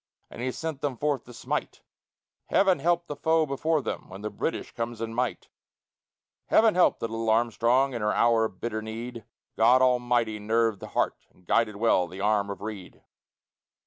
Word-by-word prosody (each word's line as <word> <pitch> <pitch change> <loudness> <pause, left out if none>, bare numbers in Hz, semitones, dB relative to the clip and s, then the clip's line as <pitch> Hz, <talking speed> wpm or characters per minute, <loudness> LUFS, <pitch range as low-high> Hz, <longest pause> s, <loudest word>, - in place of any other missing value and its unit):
and - - -8
he 130 +1 -1
sent 160 0 -5
them 140 -4 -2
forth 145 -3 -1
to 125 - -12
smite. 120 - -4 0.6
Heaven 190 -5 +3
help 170 +3 +1
the 145 - -6
foe 160 +2 +2
before 150 +2 0
him - - -5
when 95 +2 -9
the 105 - -4
Briton - - -2
comes 115 0 -4
in 115 0 -4
might! 125 +1 -2 1.0
Heaven 220 -1 +5
helped 180 - +3
the 115 - -1
little 115 0 -3
Armstrong 120 +4 +2
in 120 - -4
her 105 0 +1
hour 115 -1 +3
of 95 -4 -7
bitter 110 -2 -3
need; 115 +1 -7 0.3
God 125 +3 +5
Almighty 120 -3 +1
nerved 110 0 +1
the - - -8
heart - - -2
and 90 - -27
guided 110 +3 +1
well 100 -4 +2
the 95 +2 -10
arm 100 0 +1
of 100 - -6
Reid. 105 -4 -8
115 Hz, 180 wpm, -27 LUFS, 110-135 Hz, 1.0 s, Heaven